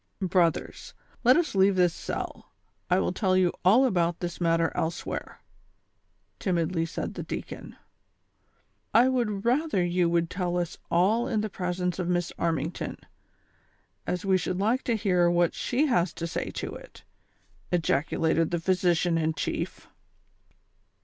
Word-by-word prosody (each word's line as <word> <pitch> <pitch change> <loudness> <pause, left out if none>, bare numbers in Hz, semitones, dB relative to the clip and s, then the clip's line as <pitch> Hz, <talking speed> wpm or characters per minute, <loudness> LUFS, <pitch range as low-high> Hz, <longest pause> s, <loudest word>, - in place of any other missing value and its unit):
" - - -47
Brothers, 180 -3 0 0.3
let 255 +4 +6
us 345 -3 0
leave 195 0 +4
this 180 -2 +3
cell, - - -6 0.4
I 180 - +4
■will 185 - 0
tell 185 -1 +1
you 180 -2 +3
all 220 +9 +6
about 175 -7 +1
this 175 0 -5
matter 165 -1 +2
elsewhere," 160 +2 -4 1.0
timidly 170 -2 0
said - - -4
the - - -5
deacon. - - -7 0.6
" - - -43
I 240 +3 +7
would 230 -6 -1
rather 250 - +2
you 175 -1 +1
would 170 -1 +1
tell 180 -1 -1
us 175 -2 -3
all 200 +7 +2
in 215 -2 0
the 215 -1 -4
presence 180 -1 -2
of 180 - -1
iliss 175 -1 0
Armington, 165 -1 -2 1.1
as 180 +1 -2
we 190 -1 +3
should 180 +1 -2
like 225 +6 +1
to 235 - +1
hear 180 -5 +2
wliat 175 -1 +2
she 270 +5 0
has 180 - +1
to 170 - -5
say 170 - -3
to - - -5
it," - - -12 0.7
ejaculated 160 0 +1
the 175 - -1
physician 175 -1 +2
In 160 0 0
chief. - - -4
180 Hz, 150 wpm, -27 LUFS, 170-195 Hz, 1.1 s, I